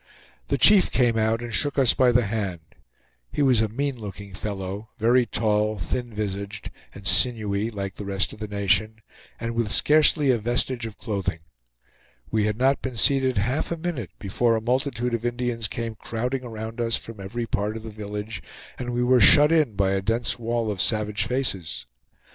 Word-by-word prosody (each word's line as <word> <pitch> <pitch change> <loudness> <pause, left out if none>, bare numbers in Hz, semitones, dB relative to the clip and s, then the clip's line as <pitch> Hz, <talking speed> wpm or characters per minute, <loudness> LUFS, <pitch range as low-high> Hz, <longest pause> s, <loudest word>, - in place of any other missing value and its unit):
The - - 0
chief 205 -2 +6
came 120 -3 +2
out 110 +1 +1
and 120 -2 -6
shook 145 +4 0
us 130 -4 +5
by 125 -1 +4
the 120 -1 +3
hand. 100 -5 -3 0.7
He 145 - 0
was 125 -5 +4
a 110 - 0
mean 135 +4 -2
looking 100 -2 -8
fellow, 100 +1 -5
very 120 +2 +3
tall, 105 -1 +1
thin 120 +8 -3
visaged, 100 -1 -5 0.2
and 100 - -11
sinewy, 110 -2 +2
like 100 -3 -5
the - - -5
rest 100 0 -1
of - - -12
the 105 - -4
nation, 105 +2 0 0.4
and 115 0 -3
with 115 -2 -1
scarcely 150 +2 +4
a 120 - +1
vestige 120 +1 -1
of 110 - -11
clothing. 100 -7 -3 0.9
We 110 -1 +2
had 105 0 -1
not 135 +3 +2
been 130 -3 -5
seated 130 +1 +2
half 125 - 0
a 170 - -1
minute 160 - -4
before 115 +4 +1
a - - 0
multitude 125 0 -1
of 115 -1 -1
Indians 120 -2 -1
came 115 +1 -4
crowding 125 +4 -3
around 115 0 -6
us 115 -1 +1
from 115 -2 -8
every 115 +5 -4
part 105 0 -2
of 110 - -9
the 110 - -7
village, 105 +1 -6 0.4
and 125 - -4
we 120 0 +1
were 125 0 +4
shut 150 +8 +7
in 155 -10 +2
by 95 -1 +2
a 95 0 0
dense 115 +4 -1
wall 115 -1 -1
of 95 -3 -2
savage 105 +1 0
faces. 95 - -2
115 Hz, 190 wpm, -24 LUFS, 105-125 Hz, 0.9 s, shut